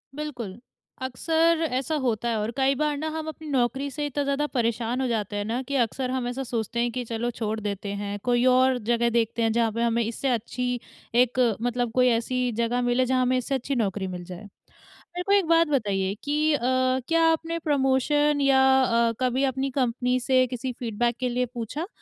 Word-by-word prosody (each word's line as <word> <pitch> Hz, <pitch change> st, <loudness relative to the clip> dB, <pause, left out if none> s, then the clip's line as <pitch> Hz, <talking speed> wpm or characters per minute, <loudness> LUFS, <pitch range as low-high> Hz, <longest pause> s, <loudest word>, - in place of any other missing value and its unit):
बिल्कुल, 245 Hz, -9 st, -6 dB, 0.4 s
अक्सर 325 Hz, +6 st, +1 dB
ऐसा 275 Hz, +5 st, -1 dB
होता 235 Hz, -2 st, 0 dB
है 225 Hz, -, 0 dB
और 215 Hz, +2 st, -2 dB
कई 270 Hz, +1 st, +3 dB
बार 300 Hz, +1 st, 0 dB
ना 310 Hz, +2 st, -3 dB
हम 315 Hz, 0 st, -5 dB
अपनी 315 Hz, 0 st, -7 dB
नौकरी 270 Hz, +1 st, 0 dB
से 295 Hz, +2 st, -3 dB
इतना 290 Hz, 0 st, -2 dB
ज़्यादा 280 Hz, +1 st, 0 dB
परेशान 235 Hz, -1 st, -1 dB
हो 260 Hz, -, 0 dB
जाते 210 Hz, -3 st, -2 dB
हैं 205 Hz, 0 st, -2 dB
ना 235 Hz, +4 st, -2 dB
कि 280 Hz, -, -2 dB
अक्सर 250 Hz, +1 st, 0 dB
हम 255 Hz, -2 st, -2 dB
ऐसा 260 Hz, +2 st, -3 dB
सोचते 235 Hz, -1 st, -3 dB
हैं 240 Hz, 0 st, +1 dB
कि 250 Hz, +1 st, -3 dB
चलो 230 Hz, +1 st, -2 dB
छोड़ 220 Hz, -1 st, -3 dB
देते 200 Hz, -1 st, -4 dB
हैं, 205 Hz, 0 st, -4 dB
कोई 245 Hz, 0 st, +2 dB
और 255 Hz, 0 st, +4 dB
जगह 235 Hz, 0 st, +3 dB
देखते 230 Hz, 0 st, 0 dB
हैं 225 Hz, -1 st, +2 dB
जहाँ 230 Hz, -1 st, +1 dB
पे 230 Hz, +2 st, -3 dB
हमें 235 Hz, 0 st, +1 dB
इससे 235 Hz, +4 st, -2 dB
अच्छी 245 Hz, +1 st, -2 dB, 0.4 s
एक 255 Hz, +1 st, -4 dB, 0.2 s
मतलब 245 Hz, -1 st, -1 dB
कोई 250 Hz, +2 st, +3 dB
ऐसी 245 Hz, +2 st, 0 dB
जगह 240 Hz, +2 st, 0 dB
मिले 245 Hz, +1 st, +2 dB
जहाँ 255 Hz, 0 st, +1 dB
हमें 255 Hz, 0 st, +2 dB
इससे 260 Hz, +2 st, -1 dB
अच्छी 270 Hz, +2 st, -2 dB
नौकरी 200 Hz, -4 st, -1 dB
मिल 180 Hz, -1 st, -6 dB
जाए। 180 Hz, +3 st, -9 dB, 0.5 s
मेरे 355 Hz, +1 st, -8 dB
को -, -, +1 dB
एक 395 Hz, -4 st, +4 dB
बात 330 Hz, 0 st, +4 dB
बताइए 200 Hz, -8 st, 0 dB
कि 300 Hz, +2 st, +1 dB
अ, 290 Hz, -, +1 dB, 0.5 s
क्या 330 Hz, 0 st, +2 dB
आपने 330 Hz, +1 st, -2 dB
प्रमोशन 290 Hz, 0 st, +2 dB
या 270 Hz, -1 st, +4 dB, 0.2 s
अ, 235 Hz, -1 st, +2 dB
कभी 255 Hz, +2 st, +1 dB
अपनी 270 Hz, 0 st, 0 dB
कंपनी 250 Hz, -1 st, 0 dB
से 255 Hz, 0 st, +3 dB
किसी 250 Hz, +1 st, -4 dB
फीडबैक 235 Hz, 0 st, -1 dB
के 255 Hz, -1 st, 0 dB
लिए 250 Hz, +1 st, 0 dB
पूछा? 255 Hz, -, -4 dB
250 Hz, 205 wpm, -25 LUFS, 230-275 Hz, 0.5 s, और